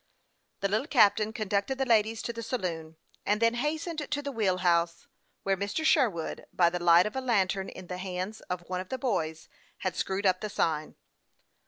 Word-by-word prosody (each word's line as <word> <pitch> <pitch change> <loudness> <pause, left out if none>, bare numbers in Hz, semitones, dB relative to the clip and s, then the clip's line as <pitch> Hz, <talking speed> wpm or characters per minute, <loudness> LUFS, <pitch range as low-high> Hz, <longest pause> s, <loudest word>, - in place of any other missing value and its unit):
The 200 - +2
little 215 +8 0
captain 215 -6 +4
conducted 215 +4 -1
the 270 - 0
ladies 225 -2 +2
to 235 - -3
the 230 - -6
saloon, 170 -9 -4 0.3
and 210 +1 +1
then 230 0 +3
hastened 310 +6 -2
to 290 0 -1
the 285 - -3
wheel 205 -7 +1
house, 170 -1 +2 0.4
where 195 0 +2
Mr. 200 - -2
Sherwood, 220 - +1
by 170 -2 +3
the 175 0 -3
light 170 +1 +7
of 210 - -4
a 265 - -1
lantern 195 -6 +1
in 185 - -10
the 180 +1 -6
hands 185 +3 -4
of 180 -1 -4
one 185 0 -2
of 185 - -10
the 260 - -2
boys, 165 -11 -2 0.4
had 185 -1 0
screwed 195 +1 -2
up 185 -1 +3
the 215 - -3
sign. 155 -5 -1
200 Hz, 195 wpm, -29 LUFS, 180-230 Hz, 0.4 s, light